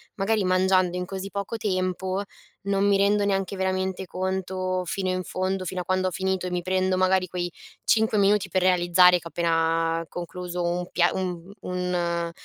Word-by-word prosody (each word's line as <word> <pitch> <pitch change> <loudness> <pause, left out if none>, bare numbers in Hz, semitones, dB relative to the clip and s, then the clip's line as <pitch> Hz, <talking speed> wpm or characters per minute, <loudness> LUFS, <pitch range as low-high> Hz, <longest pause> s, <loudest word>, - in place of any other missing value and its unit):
magari 210 +1 +1
mangiando 185 -1 +2
in 180 - -2
così 195 +1 -6
poco 200 +3 -4
tempo, 185 -1 -1 0.5
non 200 0 +2
mi 200 -1 +4
rendo 205 +1 +3
neanche 195 -1 0
veramente 190 0 -1
conto 185 0 -2
fino 185 +2 -2
in 185 0 -1
fondo, 185 +2 -2
fino 185 0 -3
a 175 - -8
quando 185 0 +1
ho 185 - -2
finito, 190 +1 -1
e - - -5
mi 180 0 -1
prendo 185 +1 +1
magari 185 0 +2
quei 175 0 -3 0.4
5 220 -1 +3
minuti 200 -1 +3
per 185 +1 +1
realizzare, 180 0 +5
che - - -18
ho - - -9
appena 165 0 +1
concluso 175 0 -5
un 175 +1 -1
pia 175 -1 +3
un 180 -1 -4
un 175 -2 -2
185 Hz, 180 wpm, -25 LUFS, 180-190 Hz, 0.5 s, realizzare